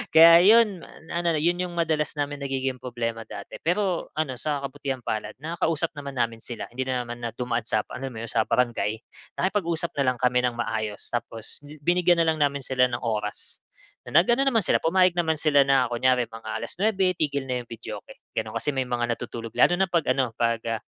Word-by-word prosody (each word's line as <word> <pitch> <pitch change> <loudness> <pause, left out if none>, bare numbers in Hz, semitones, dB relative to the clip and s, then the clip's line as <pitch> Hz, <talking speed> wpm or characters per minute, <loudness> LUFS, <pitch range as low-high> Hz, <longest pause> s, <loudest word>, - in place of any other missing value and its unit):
Kaya 165 +1 +10
'yon 210 -3 +5 0.3
na 170 - -2
na 165 -3 +1
'yon 175 +3 +1
yung 175 -1 -5
madalas 155 -2 0
namin 145 0 -2
nagiging 135 -2 -2
problema 115 -2 -3
dati. 100 -2 -9
Pero 180 +1 0
ano 140 -5 -1
sa 145 +3 -2
kabutihang-palad 130 -5 -4
nakakausap 165 0 -1
naman 140 -2 -7
namin 115 -1 -1
sila, 120 - -6
hindi 130 +2 -2
na 130 -1 -1
naman 120 0 -7
na 115 - -2
dumaan 120 -2 -2
sa, 110 - +1
alam 135 +1 -5
mo 110 - -8
yun, 115 - -5
sa - - +2
barangay. 115 -2 0 0.4
Nakipag-usap 170 -4 0
na 130 - +3
lang 125 - -13
kami 125 0 +3
ng 125 -1 0
maayos 110 -3 -2
tapos 115 -1 -4
bi 145 +1 -12
binigyan 175 +2 +3
na 165 - +3
lang 160 -1 +1
namin 140 0 0
sila 125 -1 +3
ng 120 - -2
oras, 105 -3 -4 0.5
na - - +6
nag-ano 240 +7 +2
naman 230 -6 +3
sila, - - +3
pumayag 185 +2 +4
naman 160 -2 +1
sila 150 -2 +4
na, 135 -2 +4
kunyari 125 +1 +2
mga 115 -1 -9
alas - - -5
nuebe, 195 -3 +3
tigil 140 -3 0
na 125 -1 -2
yung 120 - -17
videoke, 115 - -8 0.2
gano'n. 110 0 -3
Kasi 115 +6 0
may 130 -1 -1
mga 120 -1 0
natutulog, 115 0 -7
lalo 175 - +4
na 190 - +3
'pag-ano, 135 -7 +1
'pag, 115 -1 +1
ah, 115 -1 -2
135 Hz, 205 wpm, -25 LUFS, 120-165 Hz, 0.5 s, Kaya